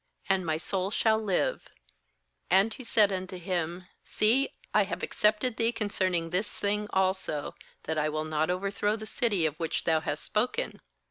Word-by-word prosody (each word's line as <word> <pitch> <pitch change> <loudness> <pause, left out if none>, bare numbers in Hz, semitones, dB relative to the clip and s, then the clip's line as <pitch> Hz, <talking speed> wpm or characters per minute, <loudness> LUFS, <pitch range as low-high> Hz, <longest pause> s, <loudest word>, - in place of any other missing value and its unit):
— - - -26
and 190 -1 +2
my 160 -2 0
soul 185 +3 -2
shall 220 +1 +2
live/ 195 -4 0 0.8
21And 195 +5 +4
he 255 - -9
said 215 -3 +4
unto 185 -1 -4
him: 175 0 -3 0.2
'See, 240 +6 +2 0.2
I - - +5
have - - -5
accepted 215 +3 +1
thee 230 0 +2
concerning 185 -7 -1
this 195 +4 0
thing 210 +1 -1
also, 190 -6 0 0.3
that 160 0 -1
I 150 0 +1
will 155 +1 -2
not 155 +1 0
over 185 +2 -1
throw 205 +1 0
the 215 -1 -7
city 215 -7 +1
of 155 -1 -2
which 165 -1 -1
thou 160 -1 +3
hast 160 - -3
spoken. 250 - -1
190 Hz, 180 wpm, -29 LUFS, 170-215 Hz, 0.8 s, I